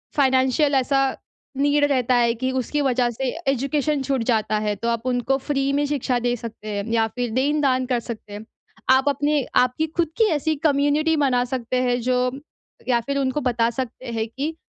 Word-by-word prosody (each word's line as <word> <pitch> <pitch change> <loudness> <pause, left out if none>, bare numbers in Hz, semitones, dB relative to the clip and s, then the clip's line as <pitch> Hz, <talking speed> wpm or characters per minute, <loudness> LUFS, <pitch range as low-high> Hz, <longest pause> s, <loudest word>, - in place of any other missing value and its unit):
Financial 265 +1 +3
ऐसा 270 +1 +2 0.6
need 290 +1 +2
रहता 255 -1 +2
है 235 -1 +3
कि 260 +3 -2
उसकी 290 +4 -1
वजह 250 -3 +1
से 265 +4 -4 0.3
एजुकेशन 280 +2 -1
छूट 265 -3 -1
जाता 220 -2 +1
है 210 -1 -1
तो 230 +4 -4
आप 230 +1 -2
उनको 250 +2 +1
फ्री 275 0 -1
में 290 +1 +1
शिक्षा 270 -3 -1
दे 245 0 0
सकते 220 -1 -9
हैं, 205 0 -3
या 225 -1 +3
फिर 245 +1 -3
देन-दान 265 -1 +1
कर 250 -2 +1
सकते 225 -3 -8
हैं। 210 +2 -8 0.5
आप 265 +2 +4
अपने 290 0 +1 0.2
आपकी 255 +6 -1
खुद 335 -2 +2
की 450 - +5
ऐसी 310 +1 0
कम्युनिटी 295 +2 +2
बना 250 -2 +2
सकते 255 0 -2
हैं 245 0 +1
जो 250 +1 +1 0.7
या 240 -2 +4
फिर 280 0 -2
उनको 270 +2 -1
बता 235 -2 +2
सकते 255 -1 -5
हैं 225 0 -1
कि 290 +6 -4
260 Hz, 190 wpm, -22 LUFS, 240-280 Hz, 0.7 s, की